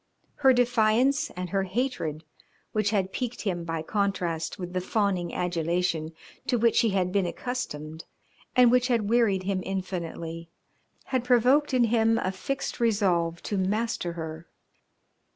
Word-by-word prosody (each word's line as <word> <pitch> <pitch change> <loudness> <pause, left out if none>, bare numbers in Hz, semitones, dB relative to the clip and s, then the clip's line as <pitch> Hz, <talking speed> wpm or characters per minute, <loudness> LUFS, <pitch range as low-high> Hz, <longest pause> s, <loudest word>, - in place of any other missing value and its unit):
Her 270 -2 +5
defiance 245 +4 +3
and 180 -1 -5
her 195 0 +1
hatred, 190 - -2 0.5
which 215 -1 +1
had 195 -3 0
piqued 245 -2 -3
him 180 -5 -2
by 165 -1 -3
contrast 180 -5 -1
with 180 -1 -6
the 185 - -1
fawning 185 -3 0
adulation 170 -2 -1 0.3
to 245 - +2
which 230 0 +3
he 230 - +3
had 185 -2 0
been 195 -2 +1
accustomed 160 - -5 0.5
and 250 -2 +6
which 250 0 +3
had 230 -5 +1
wearied 220 -6 +3
him 190 -1 -1
infinitely, 170 -3 -5 0.6
had 255 -2 +2
provoked 255 +4 +4
in 255 -2 +3
him 225 0 +3
a 185 -5 -1
fixed 270 +10 -4
resolve 185 -7 +1
to 205 - -2
master 205 -2 -1
her. 160 0 -7
195 Hz, 145 wpm, -27 LUFS, 175-235 Hz, 0.6 s, and